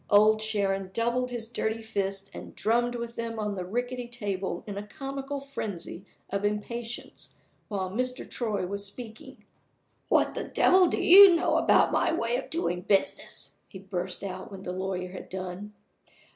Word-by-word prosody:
Old 215 +1 +6
Sharon 195 -3 0
doubled 240 +2 +1
his 235 -2 -4
dirty 225 -1 -2
fists 195 -2 -2
and - - -9
drummed 240 +2 +1
with 235 0 -5
them 230 -1 -4
on 210 -1 -2
the 185 -2 -4
rickety 245 +5 -3
table 205 -5 -3
in 205 -3 -6
a 205 +1 -6
comical 275 +2 -5
frenzy 205 -9 -6 0.3
of 200 +1 -1
impatience 230 +3 -4 0.3
while 190 -3 -3
Mr. 255 +4 -1
Troy 215 -6 -1
was 200 +2 -3
speaking. 220 +2 -8 0.6
"What - - +3
the - - -4
devil 370 0 +5
do - - 0
you 385 0 +10
know 335 - +2
about - - +4
my - - +2
way 240 -7 0
of 265 - -6
doing 320 - 0
my - - -7 0.2
business?" - - -6
he 190 - -10
burst 185 -1 -4
out 185 -1 -5
when 195 -1 -9
the 180 - -4
lawyer 185 -1 -3
had 180 - -9
done. 185 +2 -6
215 Hz, 170 wpm, -28 LUFS, 195-240 Hz, 0.6 s, you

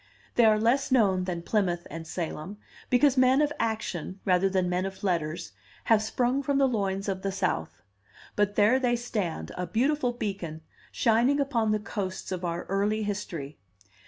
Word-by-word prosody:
They 240 - +5
are 215 -1 +5
less 245 +6 +2
known 195 -7 +3
than 175 -2 -3
Plymouth 175 -4 0
and 165 0 -7
Salem, 175 +3 -5 0.3
because 260 +2 +4
men 255 +1 +5
of 295 -1 +2
action, 200 -5 -3
rather 190 0 +3
than 185 -1 +1
men 180 +1 0
of 190 0 -10
letters, 165 - -1 0.3
have 225 -2 +4
sprung 245 +4 0
from 280 0 0
the 275 -1 +4
loins 195 -5 -1
of 190 -1 -2
the 195 - -2
South; 90 - -2 0.5
but 205 0 +1
there 220 +6 +4
they 245 -2 +2
stand, 200 - -3
a 180 0 -3
beautiful 260 +2 +1
beacon, 195 -9 -5 0.3
shining 240 +5 +3
upon 245 -6 +1
the 215 - +2
coasts 195 -3 -5
of 185 -1 -3
our 170 0 -2
early 205 +3 0
history. 170 -8 -5
205 Hz, 170 wpm, -27 LUFS, 180-240 Hz, 0.5 s, They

